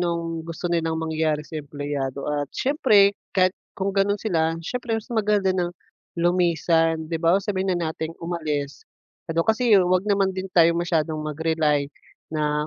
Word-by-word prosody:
anong 170 -1 -1 0.2
gusto 170 +1 -4
nilang 165 -1 0
mangyari 160 -1 -1
sa 155 0 -6
empleyado 145 -2 -4
at 145 -1 -2
siyempre 215 -8 +4 0.2
kahit 185 0 +4 0.2
kung 195 0 -1
gano'n 200 +1 +1
sila, 165 -6 0
siyempre 240 +2 -2
mas 225 +3 -7
maganda 205 -3 +2
nang 175 -1 -1 0.4
lumisan, 165 -2 +2
'di 165 - -1
ba, 170 +2 +4
sabihin 190 -3 0
na 170 -2 -1
nating 160 +1 -5
umalis. 155 -5 -3 0.5
Ano 165 +1 0
kasi, 230 +2 +2
huwag 180 0 +2
naman 195 -1 +2
din 190 0 -5
tayo 170 -2 +5
masyadong 160 -3 -1
mag 150 -1 -5
rely 155 -3 +1 0.5
na, 150 0 0
170 Hz, 155 wpm, -24 LUFS, 155-190 Hz, 0.5 s, tayo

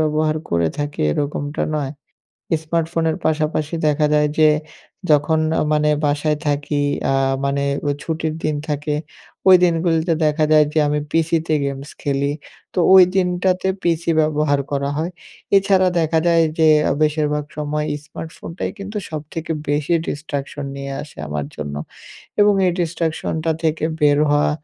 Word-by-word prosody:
ব্যবহার 155 0 +1
করে 85 -1 +2
থাকি 145 0 -3
এরকমটা 145 - -2
নয়। 145 -2 -2 0.7
স্মার্টফোনের 165 0 0
পাশাপাশি 155 0 0
দেখা 150 0 +2
যায় 150 0 +3
যে, 155 -1 +6 0.6
যখন 150 +2 +3 0.2
আ - - +2
মানে 150 0 +2
বাসায় 150 +1 +1
থাকি 145 0 0 0.3
আ - - +1 0.3
মানে 140 0 0 0.2
ওই 145 - +1
ছুটির 160 -1 -2
দিন 155 -1 +1
থাকে, 150 0 -1 0.5
ওই 185 - +10
দিনগুলিতে 165 -1 +1
দেখা 155 +1 +2
যায় 150 -1 +6
যে 160 - +1
আমি 150 0 0
পিসিতে 165 -1 +1
গেমস 140 +1 -4
খেলি। 140 0 0 0.4
তো - - -2 0.2
ওই 190 - +10
দিনটাতে 185 0 +1
পিসি 170 0 0
ব্যবহার 150 -2 +1
করা 140 0 -1
হয়। 165 +3 -2 0.5
এছাড়া 190 -1 +4
দেখা 160 0 +1
যায় 165 -1 +4 0.2
যে, 160 -1 +5 0.2
আ - - +3
বেশিরভাগ 150 -1 +1
সময় 150 0 -2 0.2
স্মার্টফোনটাই 165 +2 -6
কিন্তু 200 +2 -7
সবথেকে 155 +1 -5 0.2
বেশি 150 +3 +1
destruction 145 -1 -4
নিয়ে 140 0 -5
আসে 150 - -13
আমার 75 -1 -3
জন্য। 75 -1 -5 0.7
এবং 205 0 +5
এই 180 - +2
destruction 165 -1 -2
টা 165 - +2
থেকে 155 0 0 0.2
বের 145 -1 +4
হওয়া, 145 0 +3
155 Hz, 145 wpm, -20 LUFS, 145-165 Hz, 0.7 s, ওই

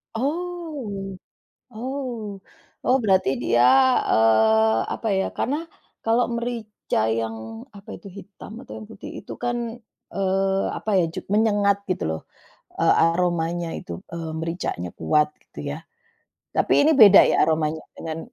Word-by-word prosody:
Oh 280 - -4 0.6
oh 240 -3 -5 0.5
oh 260 - +4
berarti 190 -9 +3
dia, 120 0 +3 0.5
eee, 110 0 +4
apa 225 - -3
ya, 190 - +1
karena 275 +4 0 0.5
kalau 230 +2 +3
merica 235 -3 -3
yang, 110 0 -1 0.4
apa 200 - -15
itu 200 - -12
hitam 200 +1 -12
atau - - -12
yang 215 - -9
putih, 220 - -10
itu - - -9
kan, 240 0 0 0.6
eee, 195 0 +1
apa 220 - -4
ya, - - +2
jug - - -6
menyengat, 205 -2 +3
gitu 185 - -1
loh, 80 - -3 0.6
e - - +1 0.2
aromanya 170 0 +1
itu, - - -9 0.2
eee, 165 -1 -5
mericanya 165 - -3
kuat, 150 - +3 0.2
gitu - - -15
ya. 145 - -4 0.8
Tapi - - +1
ini - - +5
beda 205 -2 +10
ya, - - +2
aromanya 160 0 0 0.2
dengan 160 -1 -5
195 Hz, 135 wpm, -23 LUFS, 160-225 Hz, 0.8 s, beda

